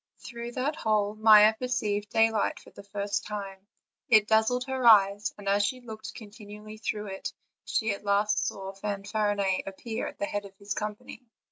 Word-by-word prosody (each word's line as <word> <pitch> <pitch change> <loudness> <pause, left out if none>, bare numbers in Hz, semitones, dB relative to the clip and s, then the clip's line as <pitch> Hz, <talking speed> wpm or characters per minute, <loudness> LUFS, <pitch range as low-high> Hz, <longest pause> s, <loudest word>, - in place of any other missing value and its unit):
Through 235 -1 -8
that 275 +5 -2
hole 210 -2 +1
Maia 215 0 +7
perceived 220 -4 -2
daylight 225 -1 +2
for - - -17
the - - -12
first 200 0 -3
time: 195 -2 -7 0.4
it 215 -2 +6
dazzled 220 +3 +2
her 260 -2 -1
eyes; 205 -1 +5
and 205 -1 -10
as 200 +1 +3
she 255 +5 -1
looked 220 -3 -9
continually 210 -1 -11
through 210 -1 -3
it, 195 -1 -5 0.3
she 220 -1 0
at 200 - -5
last 205 +1 +1
saw 195 0 -5
Fanfarinet 200 -1 -1
appear 220 +4 -5
at - - -9
the - - -1
head 205 0 -4
of 195 -1 -14
his 200 0 -4
company. 210 +3 -6
210 Hz, 170 wpm, -28 LUFS, 200-220 Hz, 0.4 s, Maia